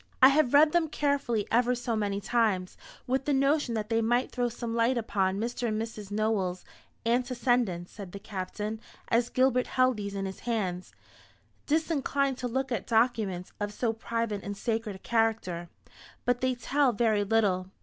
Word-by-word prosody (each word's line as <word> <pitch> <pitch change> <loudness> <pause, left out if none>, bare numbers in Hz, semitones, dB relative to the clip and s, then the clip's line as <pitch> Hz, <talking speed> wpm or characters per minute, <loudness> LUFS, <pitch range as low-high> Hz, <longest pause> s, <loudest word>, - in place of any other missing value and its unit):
"I 260 - +9
have 280 -2 +3
read 300 +1 +7
them 340 -1 +2
carefully 280 -8 0
ever 245 +2 +3
so 240 -1 -2
many 200 -2 -1
times, 205 -4 0 0.3
with 265 +1 0
the 290 - +2
notion 275 -2 +2
that 215 -1 -3
they 225 0 +2
might 240 +3 +1
throw 245 -1 0
some 235 0 -5
light 235 +2 +2
upon 195 -4 0
Mr. 240 +2 -2
and 215 -1 -1
Mrs. 220 -3 -6
Nowell's 205 -4 -1 0.4
antecedents," 240 -6 +1
said 195 -4 -9
the 200 - -7
Captain, 210 +3 -5 0.3
as 235 +1 +2
Gilbert 255 -1 +2
held 255 -2 +2
these 200 -1 -5
in 195 0 -2
his 190 0 -6
hands, 190 -6 -2 0.8
disinclined 285 -4 0
to 250 - -2
look 265 +2 -2
at 240 - -2
documents 220 -6 +1
of 205 0 -2
so 225 +2 -1
private 225 -2 -2
and 200 0 -6
sacred 225 -1 -2
a - - -8
character; 220 -6 -1 0.6
"but 245 0 +1
they 255 0 +1
tell 270 +1 +1
very 215 -2 +2
little. 200 -4 +1
230 Hz, 170 wpm, -29 LUFS, 205-250 Hz, 0.8 s, I